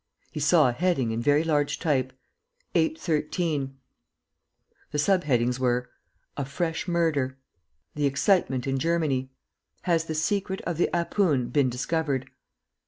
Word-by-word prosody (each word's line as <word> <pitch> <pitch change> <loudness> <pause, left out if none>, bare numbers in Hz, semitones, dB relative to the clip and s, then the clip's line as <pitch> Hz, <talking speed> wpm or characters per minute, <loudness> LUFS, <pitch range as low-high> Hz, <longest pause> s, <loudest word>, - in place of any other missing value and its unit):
He - - -5
saw 150 0 +5
a - - +2
heading 135 -4 0
in 115 +1 -2
very 145 +5 +3
large 150 -3 +1
type 130 -6 0 0.6
"813" 155 - 0 1.1
The 150 - -3
sub 180 +3 +2
headings 125 -2 +1
were: 125 -1 0 0.4
"A 140 - -2
FRESH 160 +6 -3
MURDER 155 -7 0 0.6
"THE 145 -1 +1
EXCITEMENT 140 -3 +1
IN 135 -1 0
GERMANY 155 -5 0 0.5
"HAS 165 -2 +1
THE 160 - -4
SECRET 190 +4 -1
OF 170 -3 -3
THE 175 - +2
'APOON' 170 -7 +1
BEEN 140 -3 +2
DISCOVERED?" 135 +1 -2
150 Hz, 130 wpm, -26 LUFS, 130-170 Hz, 1.1 s, saw